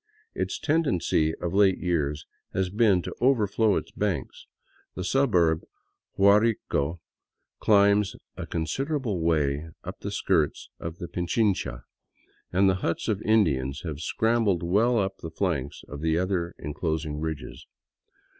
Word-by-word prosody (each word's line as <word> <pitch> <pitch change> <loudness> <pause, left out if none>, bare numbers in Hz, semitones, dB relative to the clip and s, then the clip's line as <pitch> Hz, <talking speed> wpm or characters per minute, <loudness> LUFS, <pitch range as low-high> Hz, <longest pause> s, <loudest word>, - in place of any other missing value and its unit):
Its - - -2
tendency 95 - +1
of 85 0 -4
late 95 -1 +4
years 75 -4 -1 0.3
has 95 -1 0
been 100 -4 +3
to - - -5
over 125 -4 +4
flow 105 +1 +2
its - - -3
banks; - - -3 0.5
the 90 - -4
suburb 90 - +2
of - - -24 0.5
Guarico 100 -6 +3 0.6
climbs 100 -1 +4 0.2
a - - -6
considerable 115 - -2
way 75 -2 0
up - - -7
the - - -5
skirts - - 0
of 85 0 -6
Pichincha, 90 - -1 0.7
and 95 +2 +4
the 95 - +3
huts 85 - -1
of 105 -2 0
Indians 70 -12 +1
have 80 -4 -5
scrambled 110 0 +1
well 110 +8 +3
up 95 -2 -1
the 80 - -7
flanks 80 -5 -2
of 75 0 -8
the 80 0 +1
other 90 -1 -1
enclosing 75 0 -3
ridges. 80 -2 -5
90 Hz, 135 wpm, -26 LUFS, 80-105 Hz, 0.7 s, late